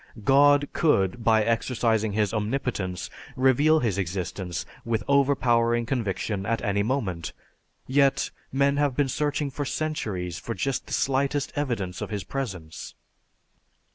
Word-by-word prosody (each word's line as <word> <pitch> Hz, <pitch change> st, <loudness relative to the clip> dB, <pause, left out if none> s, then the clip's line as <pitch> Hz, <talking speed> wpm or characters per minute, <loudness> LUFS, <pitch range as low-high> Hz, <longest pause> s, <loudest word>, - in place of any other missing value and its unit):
God 145 Hz, +3 st, +5 dB
could 115 Hz, -, +2 dB
by 110 Hz, -1 st, +4 dB
exercising 115 Hz, -2 st, +1 dB
His 105 Hz, 0 st, +1 dB
omnipotence 105 Hz, -5 st, -2 dB, 0.3 s
reveal 145 Hz, +5 st, +4 dB
His 105 Hz, -5 st, 0 dB
existence 90 Hz, 0 st, -3 dB, 0.2 s
with 115 Hz, -2 st, -1 dB
overpowering 120 Hz, -4 st, +3 dB
conviction 105 Hz, -4 st, -2 dB
at 115 Hz, +2 st, 0 dB
any 100 Hz, 0 st, +1 dB
moment; 100 Hz, -8 st, -2 dB, 0.5 s
yet, 140 Hz, +1 st, +2 dB, 0.2 s
men 140 Hz, +1 st, +2 dB
have 145 Hz, -3 st, +1 dB
been 140 Hz, -1 st, +1 dB
searching 145 Hz, +1 st, -1 dB
for 145 Hz, -, -3 dB
centuries 105 Hz, -, -3 dB
for 115 Hz, +5 st, -5 dB
just 135 Hz, -1 st, -2 dB
the -, -, -6 dB
slightest 140 Hz, +2 st, 0 dB
evidence 115 Hz, -11 st, -2 dB
of -, -, -4 dB
His 105 Hz, -3 st, -3 dB
presence. 90 Hz, -11 st, -6 dB
120 Hz, 130 wpm, -26 LUFS, 100-140 Hz, 0.5 s, God